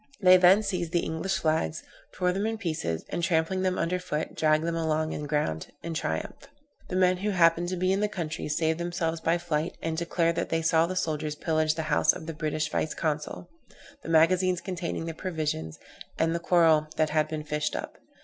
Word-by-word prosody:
They 185 -2 +7
then 185 +3 +6
seized 180 -4 -2
the 175 - +3
English 160 +4 -1
flags, 155 - 0 0.3
tore 180 -1 0
them 200 +3 -1
in 225 0 -2
pieces, 155 - -3
and - - -2
trampling 170 +2 +1
them 185 -1 0
under 175 +2 0
foot, 160 -4 -3
dragged 155 0 +2
them 165 0 -1
along 160 -1 0
the 150 - -4
ground 140 - -1 0.2
in 170 - -4
triumph. 80 - -4 0.4
The - - -4
men 185 0 +3
who 205 +3 -2
happened 175 -2 +3
to 185 - -2
be 185 +1 +1
in 195 - 0
the 210 - +2
country 170 -7 -4
saved 160 +2 0
themselves 170 -1 -2
by 165 +1 +2
flight, 165 -1 -2
and 165 0 -2
declared 170 0 0
that - - -1
they 165 0 0
saw 165 0 +3
the 185 - -4
soldiers 155 -3 -2
pillage 155 0 +1
the 160 - -2
house - - +4
of - - -8
the 165 - -5
British 155 0 -2
vice 155 - -1
consul, 155 -2 -3 0.5
the - - -8
magazines 180 +3 +4
containing 175 -3 -4
the 165 - -4
provisions, 155 - -3 0.4
and 165 0 +1
the 170 - -1
coral 165 -3 +4
that 155 -1 +1
had 155 0 +2
been 155 -1 -4
fished 150 0 -2
up. - - -6
165 Hz, 205 wpm, -27 LUFS, 155-180 Hz, 0.5 s, They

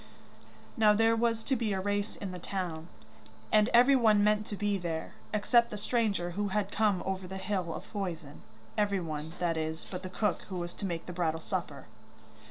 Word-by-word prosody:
Now 215 -2 +6
there 225 +2 +4
was 230 -1 +1
to 265 - +1
be 225 -4 0
a 190 - -1
race 205 +2 -1
in 195 -2 -5
the 180 - -6
town, 170 -3 -4 0.6
and 215 +1 +5
everyone 235 -4 +6
meant 210 +1 +2
to 205 - -4
be 205 -1 0
there, 170 +1 -4 0.2
except 235 +3 +3
the 210 - -5
stranger 205 -5 0
who 205 +3 -1
had 205 0 -1
come 205 -4 +2
over 190 -1 -3
the 190 +1 -6
hill 190 -3 -2
of - - -5
poison 170 -8 -4 0.3
everyone, 165 -7 -1
that 170 -2 0
is, 160 0 -3
but 180 -1 -4
the 185 - -6
cook, 200 +1 0
who 185 - -4
was 175 0 -4
to 200 - -4
make 170 -2 -4
the 180 - -6
bridal 165 -2 0
supper. 160 -6 -4
195 Hz, 190 wpm, -31 LUFS, 175-210 Hz, 0.6 s, Now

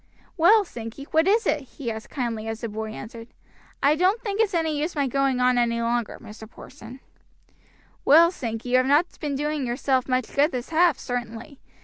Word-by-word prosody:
"Well, 400 +5 +5
Sankey, 230 -2 -8
what 320 +2 +3
is 445 +3 +3
it?" 300 - +1 0.2
he 240 -5 -3
asked 220 0 -8
kindly 230 -5 -4
as 225 0 -5
the 230 - -4
boy 220 +1 -5
entered. 230 +1 -9 0.6
"I 285 +2 +5
don't 370 +7 +2
think 425 -2 -2
it's 410 -5 0
any 320 -2 0
use 310 +4 -3
my 285 -2 +1
going 270 0 0
on 250 0 +3
any 235 -1 +1
longer, 235 -1 -1
Mr. 215 +1 -12
Porson." 255 0 -13 1.0
"Well, 335 +4 +6
Sankey, 235 -7 -5
you 255 - +4
have 255 0 +2
not 295 +5 +4
been 290 -3 -3
doing 295 +1 -2
yourself 260 +1 0
much 255 -2 -1
good 290 +3 +3
this 250 -2 -5
half, 330 -2 +3
certainly. 245 +3 -6
265 Hz, 195 wpm, -24 LUFS, 235-315 Hz, 1.0 s, Well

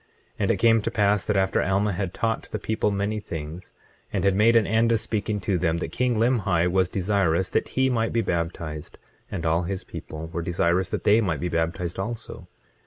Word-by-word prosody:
25:17 - - -37 0.3
And - - +1
it - - +1
came 115 -1 +4
to 110 - -2
pass 105 -3 +2
that 105 - +1
after 95 0 +2
Alma 100 +3 +1
had 95 -1 -2
taught 115 +2 -2
the - - -3
people 110 +1 -1
many 100 +2 -1
things, 80 -2 -7 0.4
and - - -1
had 100 -1 +4
made 115 +3 +4
an 115 -2 +5
end 115 +2 +2
of 115 - +3
speaking 105 -1 -2
to 95 -2 0
them, 80 -1 +1
that 85 - -4
king 125 -1 0
Limhi 105 -7 +2
was 95 -1 +2
desirous 95 -3 +1
that - - +1
he 130 0 +4
might 115 -3 0
be 115 - +1
baptized; 85 -4 -4 0.3
and 85 - -4
all 80 +1 +2
his 90 +2 -4
people 80 +1 -8
were 85 - -2
desirous 85 +2 +1
that - - -3
they 105 +3 +5
might 85 -8 -1
be 90 - -2
baptized 85 +2 -2
also. 115 +4 -6
95 Hz, 215 wpm, -25 LUFS, 85-110 Hz, 0.4 s, an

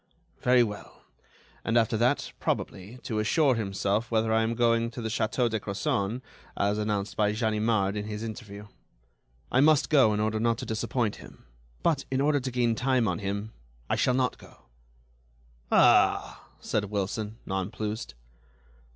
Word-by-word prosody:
Very 125 -1 +5
well, 105 -3 -7 0.6
and, 115 +1 +1
after 115 -1 +2
that, 120 +3 +1
probably, 100 +7 -3
to 110 -2 -2
assure 135 +6 +3
himself 105 0 -1
whether 110 -1 +1
I 110 - +3
am 115 +1 0
going 115 -1 +2
to 120 - -9
the 110 -1 -3
Château 115 +3 0
de 110 -1 -1
Crozon, 100 +3 -2 0.3
as 100 +1 +1
announced 105 -1 -2
by 105 -1 +2
Ganimard 110 -2 +1
in 105 0 -3
his 105 0 -5
interview. 105 -2 -7 0.9
I 125 - +3
must 150 -1 +4
go 135 -8 +6
in 105 - 0
order 110 +1 0
not 115 0 +1
to - - -6
disappoint 115 0 -1
him. - - -14 0.4
But, 150 -5 +1
in 130 - 0
order 145 +1 +3
to 130 0 -4
gain 120 -2 +1
time 125 0 +1
on 90 -3 -1
him, 100 +2 -4 0.4
I - - +3
shall 125 - +2
not 130 -1 0
go." - - -17 1.1
"Ah!" - - +4
said 105 - -1
Wilson, 105 +2 -3
nonplused. 105 - -4
110 Hz, 160 wpm, -28 LUFS, 105-120 Hz, 1.1 s, go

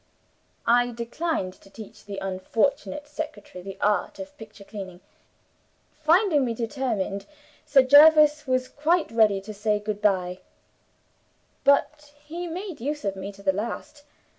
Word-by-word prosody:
I 245 +1 +4
declined 235 - -3
to 195 - -18
teach 215 +1 -12
the 200 -1 -7
unfortunate 230 +10 -1
secretary 290 - -7
the 195 0 -8
art 205 -3 +1
of 290 0 -9
picture 215 -4 -12
cleaning. 195 -4 -8 0.9
Finding 315 0 +3
me 235 -2 -1
determined, 225 -5 -3 0.4
Sir 270 -2 +6
Jervis 300 +2 +7
was 255 0 +1
quite 320 +3 0
ready 215 -3 +4
to 215 +2 -8
say 210 +1 0
good 210 0 -4
by. 185 -3 +1 1.2
But 290 +1 +2
he 340 +3 -5
made 360 - -6
use 295 +1 -3
of 195 -1 -1
me 195 +1 -6
to 200 0 -16
the 190 -1 +2
last. 235 +8 -5
235 Hz, 140 wpm, -25 LUFS, 200-295 Hz, 1.2 s, Jervis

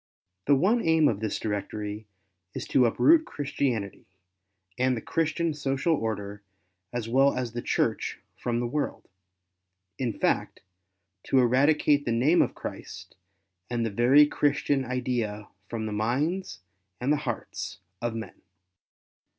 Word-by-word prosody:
The 140 - +6
one 210 - +3
aim 160 -4 +4
of 105 -6 0
this 110 -1 -2
directory 105 0 -4 0.5
is - - -4
to 125 -3 +4
uproot 315 - +5
Christianity, 130 - -3 0.7
and 130 0 +1
the - - -2
Christian 165 +5 -1
social 140 +2 0
order 105 -6 -3 0.5
as 120 -2 -3
well 135 +4 +3
as 125 -2 -2
the 120 +1 -4
Church - - -1 0.2
from 120 -1 -2
the 120 - -1
world 145 +5 -3 0.5
— 95 +1 -55
in 125 -3 0
fact, - - -1 0.6
to 135 - +2
eradicate 145 +3 +3
the 120 - 0
name 130 +9 +4
of - - 0
Christ - - -8 0.5
and 120 -1 -1
the 115 - -2
very 125 +8 +6
Christian 145 -2 +1
idea 120 -5 -2 0.2
from 115 -2 -3
the 110 - -3
minds 130 - -1 0.4
and 135 +4 +2
the - - +2
hearts 95 -9 -5 0.2
of 120 -1 -2
men. 115 0 -7
125 Hz, 140 wpm, -27 LUFS, 110-145 Hz, 0.7 s, The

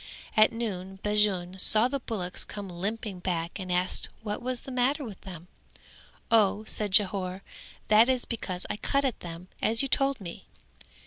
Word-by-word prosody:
At 215 -1 +6
noon 195 -5 -4
Bajun 195 -3 +2
saw 215 +5 +4
the 275 +2 -2
bullocks 195 -7 -4
come 200 -2 -7
limping 200 +2 -4
back 175 0 -2
and 185 -1 -4
asked 180 +1 +1
what 210 +1 -3
was 250 0 -2
the 270 - -9
matter 260 +4 +1
with 215 -7 -8
them. 180 -2 -9 0.8
"O," 215 -2 +4
said 210 -2 +1
Jhore, 190 -2 +2 0.5
"that 220 +3 +6
is 255 -2 +3
because 190 -6 -4
I - - -3
cut 275 +5 +1
at 260 - -1
them 170 +1 -8
as 225 +4 +3
you - - 0
told 275 0 +2
me." 175 -4 -8
210 Hz, 170 wpm, -28 LUFS, 185-230 Hz, 0.8 s, At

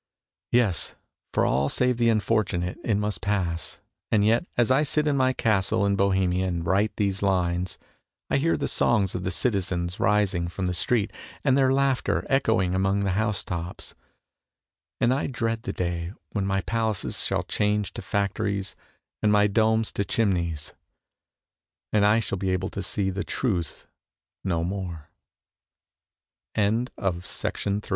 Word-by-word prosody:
Yes, 105 -9 +2 0.4
for - - +2
all 70 +2 +2
save 125 -1 +1
the 120 -1 +3
unfortunate 105 -5 0
it 110 - +1
must 105 0 -1
pass; 90 -4 -2 0.3
and 105 -2 +4
yet 115 - +2
as 120 +1 +3
I 135 +3 +5
sit 150 +1 +1
in 145 -2 +2
my 130 -1 +3
castle 105 -5 +1
in 100 0 +2
Bohemia 95 -2 +2
and 85 -2 -2
write 100 +5 +2
these 100 -2 0
lines 90 -2 0 0.5
I - - +2
hear 165 +4 +2
the - - -1
songs 105 -6 +2
of 90 - -3
the 90 - -2
citizens 90 -3 -1
rising 100 -4 +2
from 90 +2 -4
the 90 - 0
street 110 +4 +1 0.3
and 135 -3 +4
their 135 -1 +4
laughter 135 -1 +1
echoing 110 -9 +2
among 95 +2 +1
the 100 -1 +1
house 105 +1 0
tops, 85 0 -5 1.1
and 120 +2 +3
I 135 - -1
dread 115 -3 -2
the - - -4
day 85 0 -3 0.2
when 100 -2 -1
my 95 0 +1
palaces 110 0 -1
shall - - 0
change 105 -1 0
to - - -6
factories 100 0 -1 0.5
and 105 - +3
my 105 0 +5
domes 110 +2 +2
to 100 - -1
chimneys 85 -8 -1 1.2
and 105 -1 +4
I 105 +3 +4
shall 100 -3 -3
b 95 -1 +1
100 Hz, 135 wpm, -26 LUFS, 95-115 Hz, 1.2 s, I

